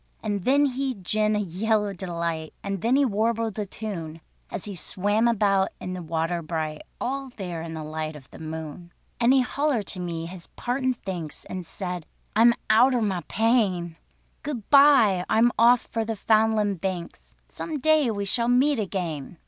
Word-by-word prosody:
And 205 -4 -2
then 280 +3 +4
he 265 -1 -1
gin 215 +2 0
a - - +1
yell 210 +3 0
of 200 - -5
delight, 170 -3 -3
And 195 -2 -3
then 235 +5 +2
he 280 0 +4
warbled 225 -1 0
a 205 - -2
tune, 170 -7 -6 0.3
As - - -5
he 205 - -5
swam 205 +6 +1
about 195 -4 +2
in 185 - -5
the 180 - -5
water 165 +1 -1
bright, 155 -1 -3 0.2
All 270 +1 -3
there 175 -5 -4
in 165 0 -6
the 160 - -5
light 155 0 -4
of 135 -3 -12
the - - -12
moon. 160 +2 -7 0.3
And 235 +1 +4
he 265 -1 +5
hollered 260 -3 0
to 185 - -7
me 170 -2 -4
his 175 0 -10
partin' 255 +1 -1
thanks, 180 -8 -6
And 180 -2 -6
said: 180 -3 -5 0.3
"I 220 - +4
am 235 0 +6
outer 245 +3 +5
my 195 -5 -1
pain; 200 -7 +1 0.5
Good 265 -8 -5
bye! 275 -10 +6
I'm 230 +2 +4
off 235 +1 +6
for 225 - -3
the 225 0 -3
'Foundland 215 -3 +2
Banks; 185 -3 -5
Some 315 -2 -5
day 305 -1 +3
we 200 -2 -2
shall 235 +4 +2
meet 255 +2 +3
again." 175 -6 -4
205 Hz, 180 wpm, -25 LUFS, 175-235 Hz, 0.5 s, am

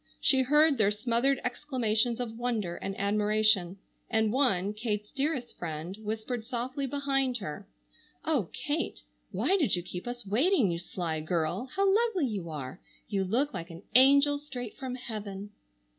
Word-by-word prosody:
She 265 -1 +4
heard 295 +1 +4
their 205 -2 +5
smothered 235 +5 +1
exclamations 245 -3 0
of 230 -2 -4
wonder 225 -7 -2
and 195 0 -5
admiration, 210 -2 +2 0.3
and 220 -1 +2
one, 210 -8 +2
Kate's 210 -1 -3
dearest 275 -3 -2
friend, 165 +2 -5
whispered 220 +2 -4
softly 255 +3 -3
behind 270 -2 0
her: 155 -9 -7 0.6
"Oh, - - +1
Kate, - - -3 0.3
why 265 - +2
did 290 - +2
you 175 - -3
keep 180 +4 -7
us 245 -1 -5
waiting, 245 - +3
you 170 - -2
sly 170 -2 -3
girl! 170 +7 -1
How 395 +1 +2
lovely 400 -4 +3
you 200 -8 -3
are! 140 -1 -6 0.3
You 200 -2 0
look 245 +10 0
like 175 -2 -5
an 170 +3 -10
angel 280 +3 +6
straight 250 -6 -7
from 260 -2 -5
heaven." 210 -4 -6
225 Hz, 155 wpm, -29 LUFS, 195-265 Hz, 0.6 s, angel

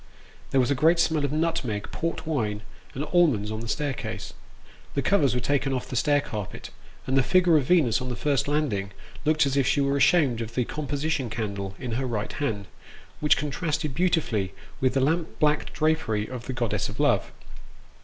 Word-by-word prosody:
There 135 - +2
was 125 +2 +2
a 135 - -1
great 165 +2 +5
smell 160 -3 +2
of 140 - 0
nutmeg, 150 -10 -1
port 165 0 -3
wine, 110 -9 -1 0.3
and 140 - -2
almonds, 135 - +3
on 110 - -3
the 115 - -6
staircase; 145 +2 -3 0.6
the 140 - 0
covers 140 -6 +3
were - - +2
taken 140 0 0
off 125 -1 -3
the 130 - -5
stair 145 +4 +3
carpet, 105 -8 -6 0.3
and 130 - 0
the 135 - +6
figure 180 +4 +4
of 145 -4 +3
Venus 140 -9 +3
on 125 - -4
the 120 - -3
first 140 +1 0
landing 120 -10 -1 0.3
looked 155 -1 +4
as 135 -1 -1
if 135 -2 +2
she 145 - +2
were 140 0 +2
ashamed 140 -4 +3
of 115 0 -6
the 125 - +1
composition 145 -2 -2
candle 100 -3 -4
in 125 -3 -5
her 130 +3 -1
right 110 -4 -3
hand, 110 -9 -2 0.5
which 150 - +4
contrasted 150 -1 -2
beautifully 130 - 0 0.2
with 130 0 +1
the 135 - +3
lamp 160 +4 0
blacked 150 0 +1
drapery 155 -10 0
of 125 -2 -7
the 130 - -3
goddess 120 -3 -1
of - - -8
love. - - +2
135 Hz, 195 wpm, -26 LUFS, 115-155 Hz, 0.6 s, the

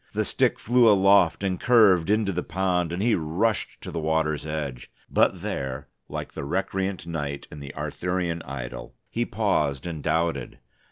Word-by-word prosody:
The - - 0
stick - - +2
flew 120 0 +4
aloft 100 -2 +4
and 95 -2 -1
curved 100 -8 +5
into 105 -1 +2
the 90 -1 -2
pond, 90 -1 0
and 90 +4 -2
he 115 0 +3
rushed 95 +7 0
to - - -7
the 85 - -3
water's 80 -1 0
edge. 75 -5 -4 0.2
But - - +2
there, 65 -1 -4 0.2
like - - -5
the - - -5
recreant 95 +6 -2
knight 75 -4 -4
in 75 - -9
the 70 -1 -9
Arthurian 90 -2 -2
idyl, 65 -3 -7 0.2
he 120 +1 0
paused 85 - 0
and 80 -3 -5
doubted. 85 +2 -1
85 Hz, 165 wpm, -25 LUFS, 75-100 Hz, 0.2 s, curved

